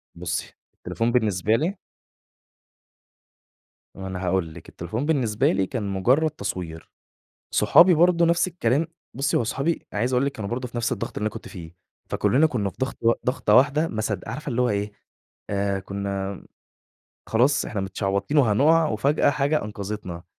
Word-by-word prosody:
بُصّي، 85 Hz, 0 st, -4 dB, 0.2 s
التليفون 115 Hz, +1 st, -2 dB
بالنسبة 110 Hz, -3 st, +2 dB
لي 170 Hz, -, -1 dB, 2.2 s
ما 95 Hz, 0 st, -6 dB
أنا 95 Hz, 0 st, -5 dB
هاقول 90 Hz, -3 st, 0 dB
لِك 85 Hz, -, -12 dB
التليفون 110 Hz, -, -4 dB
بالنسبة 125 Hz, -9 st, +1 dB
لي 95 Hz, 0 st, +1 dB
كان 115 Hz, +1 st, -4 dB
مجرّد 120 Hz, +11 st, +2 dB
تصوير، 85 Hz, -, -6 dB, 0.6 s
صحابي 180 Hz, +1 st, +6 dB
برضه 170 Hz, +1 st, +4 dB
نفس 170 Hz, +2 st, +2 dB
الكلام، 155 Hz, -2 st, 0 dB, 0.3 s
بُصّي، 140 Hz, +1 st, +1 dB
هو -, -, +1 dB
صحابي 135 Hz, +8 st, 0 dB, 0.2 s
أنا 105 Hz, -, -2 dB
عايز 125 Hz, +3 st, 0 dB
أقول 125 Hz, +3 st, +2 dB
لِك 140 Hz, -, 0 dB
كانوا 105 Hz, -6 st, -6 dB
برضه 125 Hz, +1 st, -3 dB
في 120 Hz, -, -8 dB
نفس 120 Hz, 0 st, 0 dB
الضغط -, -, -4 dB
اللي 105 Hz, -, -2 dB
أنا -, -, +1 dB
كنت -, -, -8 dB
فيه، 85 Hz, -3 st, -10 dB, 0.4 s
فكلّنا 155 Hz, +5 st, +3 dB
كنا 105 Hz, -9 st, -1 dB
في -, -, -17 dB
ضغط 130 Hz, -, -2 dB
و 115 Hz, 0 st, +4 dB
ضغطة 125 Hz, -4 st, +2 dB
واحدة، 150 Hz, +5 st, +4 dB
ما 110 Hz, -5 st, -3 dB
صدق 105 Hz, -1 st, -3 dB
عارفة 145 Hz, +5 st, -5 dB
اللي 125 Hz, 0 st, 0 dB
هو 125 Hz, -, +2 dB
إيه، 105 Hz, 0 st, -1 dB, 0.6 s
آآ، 100 Hz, -1 st, 0 dB
كنا 100 Hz, 0 st, -4 dB, 0.9 s
خلاص 125 Hz, +6 st, +3 dB
إحنا 100 Hz, -, -3 dB
متشعبطين 100 Hz, +8 st, -1 dB
وهنقع، 145 Hz, +7 st, +4 dB
وفجأة 140 Hz, +8 st, +2 dB
حاجة 140 Hz, +2 st, 0 dB
أنقذتنا، 100 Hz, -4 st, -6 dB
115 Hz, 165 wpm, -24 LUFS, 100-140 Hz, 2.2 s, صحابي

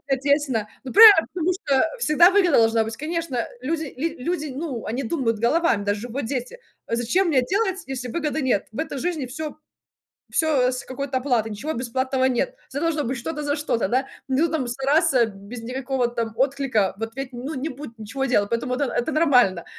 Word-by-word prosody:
ответственно. 275 Hz, -5 st, 0 dB, 0.2 s
Ну 260 Hz, -, -6 dB
правильно, 415 Hz, -6 st, +9 dB
потому 355 Hz, 0 st, 0 dB
что 280 Hz, -7 st, +1 dB, 0.2 s
всегда 340 Hz, -2 st, +5 dB
выгода 365 Hz, -6 st, +4 dB
должна 225 Hz, 0 st, +4 dB
быть 225 Hz, +1 st, -6 dB
конечно 315 Hz, -5 st, -2 dB, 0.2 s
люди 315 Hz, +4 st, -2 dB
ли 320 Hz, +6 st, -3 dB
люди, 305 Hz, +3 st, -2 dB
ну, 275 Hz, -6 st, -4 dB
они 240 Hz, +5 st, -3 dB
думают 230 Hz, -4 st, -1 dB
головами, 235 Hz, -3 st, +2 dB
даже 205 Hz, +4 st, -2 dB
вот 265 Hz, +2 st, -3 dB
дети, 260 Hz, -, -4 dB, 0.3 s
"Зачем 240 Hz, +11 st, +1 dB
мне 275 Hz, -5 st, +3 dB
делать, 380 Hz, -, -1 dB
если 250 Hz, -2 st, -5 dB
выгоды 310 Hz, +1 st, -2 dB
нет". 250 Hz, -7 st, 0 dB
В -, -, -6 dB
этой 315 Hz, -3 st, -3 dB
жизни 325 Hz, -5 st, -2 dB
всё 300 Hz, +4 st, -6 dB, 0.8 s
всё 275 Hz, -6 st, +2 dB
с 250 Hz, -, -4 dB
какой-то 265 Hz, 0 st, -3 dB
оплатой, 240 Hz, -5 st, 0 dB
ничего 285 Hz, +10 st, -4 dB
бесплатного 260 Hz, +2 st, -1 dB
нет. 265 Hz, -, 0 dB
Всё 280 Hz, -, -4 dB
должно 325 Hz, -3 st, 0 dB
быть 260 Hz, +3 st, -2 dB
что-то 300 Hz, +4 st, -4 dB
за 285 Hz, -, 0 dB
что-то, 265 Hz, -8 st, 0 dB
да. 260 Hz, +5 st, +1 dB, 0.2 s
Ну 275 Hz, +6 st, +2 dB
там 305 Hz, -6 st, -1 dB
стараться 270 Hz, 0 st, +2 dB
без 215 Hz, +3 st, -9 dB
никакого 255 Hz, 0 st, -1 dB
там 230 Hz, -2 st, -3 dB
отклика. 260 Hz, -7 st, +1 dB
Вот, 225 Hz, 0 st, -5 dB
ведь 270 Hz, -1 st, -5 dB
ну 255 Hz, +6 st, -5 dB
не 270 Hz, +4 st, -3 dB
будет 255 Hz, -3 st, -9 dB
ничего 260 Hz, +6 st, -4 dB
делать, 205 Hz, -6 st, +1 dB
поэтому 235 Hz, +2 st, -2 dB
вот 275 Hz, -, -4 dB
это 265 Hz, -, -1 dB
н -, -, +1 dB
это 315 Hz, -, -3 dB
нормально. 250 Hz, -, +3 dB
265 Hz, 195 wpm, -23 LUFS, 235-310 Hz, 0.8 s, правильно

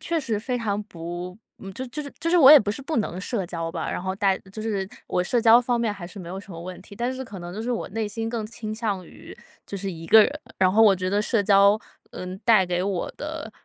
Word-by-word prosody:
确 335 Hz, -1 st, -1 dB
实 235 Hz, -8 st, -2 dB
非 250 Hz, +2 st, -2 dB
常 210 Hz, -3 st, -1 dB
不 175 Hz, 0 st, -7 dB, 0.4 s
就 260 Hz, +5 st, -4 dB
是 -, -, -8 dB
就 300 Hz, +5 st, -5 dB
是 285 Hz, -, -8 dB
就 330 Hz, -, 0 dB
是 355 Hz, -, +4 dB
我 275 Hz, -4 st, +9 dB
也 305 Hz, -, +11 dB
不 210 Hz, -5 st, -1 dB
是 215 Hz, -, -4 dB
不 305 Hz, +4 st, -3 dB
能 185 Hz, -4 st, -2 dB
社 200 Hz, 0 st, -2 dB
交 165 Hz, -2 st, -4 dB
吧， -, -, -4 dB
然 -, -, -3 dB
后 190 Hz, 0 st, -2 dB
待 195 Hz, -1 st, +1 dB
就 215 Hz, +1 st, -6 dB
是 200 Hz, -4 st, -2 dB, 0.2 s
我 180 Hz, -, 0 dB
社 235 Hz, +6 st, +1 dB
交 230 Hz, +1 st, +7 dB
方 245 Hz, -1 st, 0 dB
面 225 Hz, -3 st, 0 dB
还 195 Hz, -4 st, -8 dB
是 195 Hz, +3 st, -10 dB
没 170 Hz, -2 st, -8 dB
有 190 Hz, -, -5 dB
什 200 Hz, -, -14 dB
么 165 Hz, -, -8 dB
问 180 Hz, +1 st, -8 dB
题。 200 Hz, -, -13 dB
但 240 Hz, +3 st, -1 dB
是 260 Hz, 0 st, -5 dB
可 205 Hz, -5 st, -9 dB
能 175 Hz, 0 st, -7 dB
就 205 Hz, -, -6 dB
是 245 Hz, -, -3 dB
我 240 Hz, -, -2 dB
内 220 Hz, +1 st, -2 dB
心 225 Hz, +2 st, -4 dB
更 225 Hz, -2 st, -3 dB
倾 215 Hz, -1 st, -6 dB
向 210 Hz, -5 st, -2 dB
于 -, -, -13 dB, 0.3 s
就 200 Hz, -, -5 dB
是 195 Hz, 0 st, -3 dB
一 165 Hz, -1 st, -8 dB
个 220 Hz, +5 st, +8 dB
人。 295 Hz, +7 st, -2 dB, 0.2 s
然 185 Hz, -1 st, +4 dB
后 220 Hz, +3 st, +5 dB
我 210 Hz, -3 st, +7 dB
觉 185 Hz, 0 st, -2 dB
得 205 Hz, +1 st, +2 dB
社 215 Hz, 0 st, +1 dB
交， 200 Hz, +1 st, +5 dB, 0.3 s
嗯， 185 Hz, +1 st, -6 dB
带 220 Hz, -5 st, +5 dB
给 180 Hz, 0 st, -1 dB
我 190 Hz, -2 st, -2 dB
的， 300 Hz, -5 st, -6 dB
205 Hz, 300 characters per minute, -24 LUFS, 185-235 Hz, 0.4 s, 也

